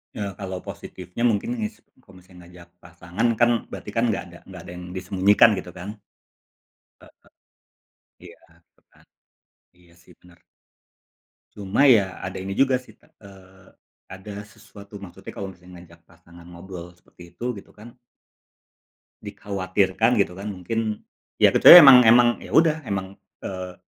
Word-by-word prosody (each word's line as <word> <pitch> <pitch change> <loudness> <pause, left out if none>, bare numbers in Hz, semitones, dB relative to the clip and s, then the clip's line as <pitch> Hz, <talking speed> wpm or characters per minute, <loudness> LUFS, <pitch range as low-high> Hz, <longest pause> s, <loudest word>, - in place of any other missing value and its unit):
Ya 100 -2 -5
kalau 95 -2 -7
positifnya 90 +6 -8
mungkin 175 - -2
ngis 220 0 -6 0.2
kalau 90 -7 -19
ngajak 90 -1 -17
pasangan 90 +6 -4
kan 120 +1 +1
berarti 105 - -9
kan 115 +2 -1
nggak 105 -4 -2
ada 85 - -13
nggak 95 -3 -11
ada - - -11
yang 90 0 -10
disembunyikan 95 +4 +3
gitu 90 - -10
kan. 105 +4 -9 1.0
Heeh. - - -22 0.9
Iya, 470 - -15 0.3
gitu - - -38
kan. - - -26 0.7
Iya 85 -1 -24
sih 90 - -20
bener. 90 -1 -22 1.2
Cuma 100 +8 +1
ya 100 -7 +3
ada 95 - -7
ini 95 - -6
juga 135 +5 +2
sih, 125 -4 -10
te - - -27 0.2
eee, 95 -1 -18 0.4
ada 95 +2 -10
sesuatu 105 -1 -15
maksudnya 95 -3 -12
kalau 100 - -7
misalnya 90 -1 -15
ngajak 85 -1 -18
pasangan 85 0 -19
ngobrol 90 0 -11
seperti 85 0 -19
itu 120 -1 -5
gitu 100 - -14
kan 115 +4 -15 1.3
dikhawatirkan 100 +4 -1
gitu 95 -3 0
kan 100 +2 -8
mungkin 110 +4 -4 0.4
ya - - +5
kecuali 175 - +10
emang 130 -4 +9
emang 120 +2 +6 0.2
ya - - -12
udah 160 -1 +3
emang, 95 -1 -5 0.3
eee 95 -1 -7
95 Hz, 145 wpm, -22 LUFS, 90-110 Hz, 1.3 s, kecuali